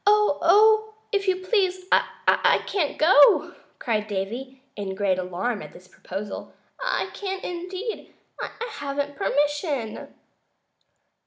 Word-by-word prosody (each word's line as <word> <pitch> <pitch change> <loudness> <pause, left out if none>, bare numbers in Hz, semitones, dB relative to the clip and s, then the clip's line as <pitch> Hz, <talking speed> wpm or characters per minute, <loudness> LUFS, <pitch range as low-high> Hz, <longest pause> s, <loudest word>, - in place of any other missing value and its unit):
"Oh, 425 +2 +4 0.2
if 400 -2 0
you 370 0 0
please, 370 -3 +1
I - - +3
can't 345 -8 -1
go!" 310 -3 +6 0.2
cried 215 -3 -1
Davy, 240 +7 -5
in 195 -2 -4
great 190 -2 +1
alarm 185 +5 -2
at - - -10
this 180 - -15
proposal; 195 +3 -7 0.3
"I - - -1
can't, 385 -2 -5
indeed. 365 +5 -5 0.3
I - - -3 0.2
haven't 285 -2 -4
permission." 290 - -1
290 Hz, 110 wpm, -24 LUFS, -, 0.3 s, go